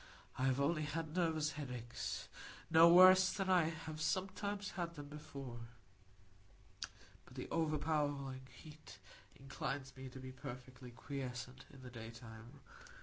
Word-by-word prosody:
I 130 - 0
have 130 0 +2
only 155 +3 +2
had 155 +2 -3
nervous 160 -4 +2
headaches,—no 145 +5 +1
worse 185 +1 +9
than 195 -2 0
I 180 -3 +6
have 160 -1 -6
sometimes 195 +4 -1
had 170 -2 -3
them 145 -1 -8
before. 140 -5 -7 1.6
But - - -16
the - - -5
overpowering 145 -4 0
heat 150 +4 -12 0.4
inclines 135 0 -4
me 130 0 -7
to 130 - -10
be 130 0 -7
perfectly 130 -1 -8
quiescent 130 0 -6
in 135 -2 -13
the 125 - -8
daytime. 115 +1 -10
145 Hz, 125 wpm, -38 LUFS, 130-165 Hz, 1.6 s, worse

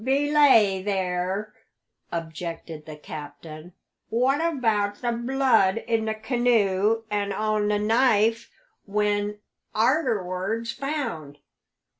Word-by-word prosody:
"Belay 270 -7 +4
there!" 190 +1 -2 0.6
objected 165 -1 -6
the 155 - -7
captain. 155 +3 -10 0.4
"What 255 +6 +2
about 225 -11 0
the 240 - +1
blood 235 -4 +2
in 225 -1 0
the 220 0 -1
canoe 220 -2 +1
and 205 -1 -1
on 215 +1 0
the 210 0 +2
knife 225 +1 +2 0.4
when 205 0 0 0.4
arterwards 220 - 0
found? 250 - -4
210 Hz, 95 wpm, -25 LUFS, 185-235 Hz, 0.6 s, Belay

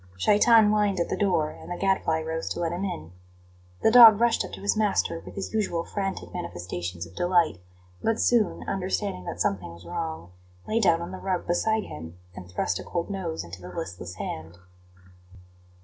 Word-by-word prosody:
Shaitan 210 - +5
whined 205 -3 +2
at 170 - 0
the - - 0
door, 175 -7 +1
and - - -12
the 175 - -4
Gadfly 190 -5 +1
rose 160 +1 -3
to - - -4
let 170 -1 -1
him 175 +3 -3
in. 175 - -5 0.7
The - - +5
dog 225 -3 +10
rushed 235 -1 +3
up - - -8
to - - -7
his 200 +2 +1
master 210 -5 +1
with - - -11
his 195 +1 -5
usual 195 -6 0
frantic 195 -2 -4
manifestations 90 - -5
of 85 +1 -16
delight, 175 - +2 0.4
but 225 0 0
soon, 235 -4 +2
understanding 190 - -2
that 90 - -6
something 90 -1 -1
was 85 +1 -13
wrong, 80 0 -5 0.4
lay 225 - +1
down 170 -5 +3
on 175 - -7
the 185 - -7
rug 185 -2 -2
beside 220 +5 +1
him, 80 +3 -9 0.2
and 90 - -10
thrust 90 0 -1
a - - -6
cold 170 +3 -3
nose 175 - -3
into 90 +2 -10
the 90 - -9
listless 90 0 -6
hand. 80 -1 -6
175 Hz, 190 wpm, -26 LUFS, -, 0.7 s, dog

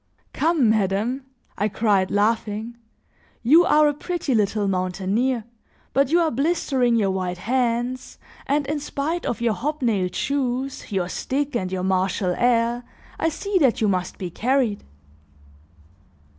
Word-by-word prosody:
"Come, 315 -5 +2
madame," 220 +6 0 0.3
I 205 - +2
cried, 200 -3 +1
laughing, 220 +2 0 0.7
"you 320 +9 +6
are 300 -2 +5
a 295 - +2
pretty 310 -1 -2
little 210 -1 +1
mountaineer, 195 +6 0 0.5
but 275 0 +3
you 340 +3 +4
are 325 - +1
blistering 270 -3 +1
your 205 -4 +2
white 185 -1 -2
hands 245 +3 -1 0.3
and 285 +1 +1
in 300 +2 -2
spite 300 +4 -3
of 235 - -2
your 235 -2 +2
hobnailed 230 -6 -1
shoes, 265 -2 -2
your 185 -3 0
stick 275 +8 -2
and 185 -5 -1
your 185 -1 -2
martial 190 0 0
air, 240 0 +2 0.4
I 325 - +2
see 400 +4 -1
that 265 -7 +3
you 220 - +2
must 185 -2 -1
be 180 -2 -5
carried." 240 0 0
235 Hz, 140 wpm, -23 LUFS, 200-275 Hz, 0.7 s, you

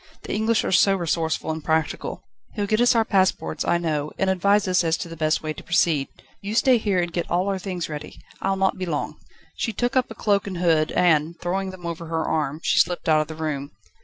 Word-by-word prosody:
The - - -5
English 220 +2 +1
are - - -2
so 195 +1 +5
resourceful 165 -3 -1
and 160 -1 -5
practical. 160 -1 -1 0.3
He'll 205 -2 -1
get 215 +3 +1
us 245 0 +4
our 225 -1 +3
passports, 190 -6 +1
I 170 - +2
know, 155 -3 -2
and 190 0 +2
advise 200 +2 +2
us 180 -1 +3
as 165 0 +1
to - - -5
the 165 - -8
best 155 0 0
way 155 0 -2
to - - -11
proceed. 160 -5 +2
Do - - -21 0.2
you 205 +2 -4
stay 250 0 +4
here 200 -4 +1
and 175 -1 -2
get 175 - -2
all 180 +3 +1
our 195 -1 -1
things 180 -3 -4
ready. 150 -1 -8 0.2
I'll 195 0 +1
not 190 -1 0
be 185 - -3
long." 150 -3 -3 0.4
She 225 - -2
took 245 +5 -1
up 255 -1 +2
a - - -8
cloak 200 -1 +1
and 185 -3 -4
hood, 165 -3 +2
and, 165 -1 +2
throwing 190 +2 -2
them 185 -2 -10
over 170 0 -5
her 160 0 -1
arm, 155 -1 -1
she - - +3
slipped 175 +1 +1
out 155 -1 +4
of 155 - -4
the 160 - -7
room. 150 -4 -4
175 Hz, 245 wpm, -23 LUFS, 160-195 Hz, 0.4 s, so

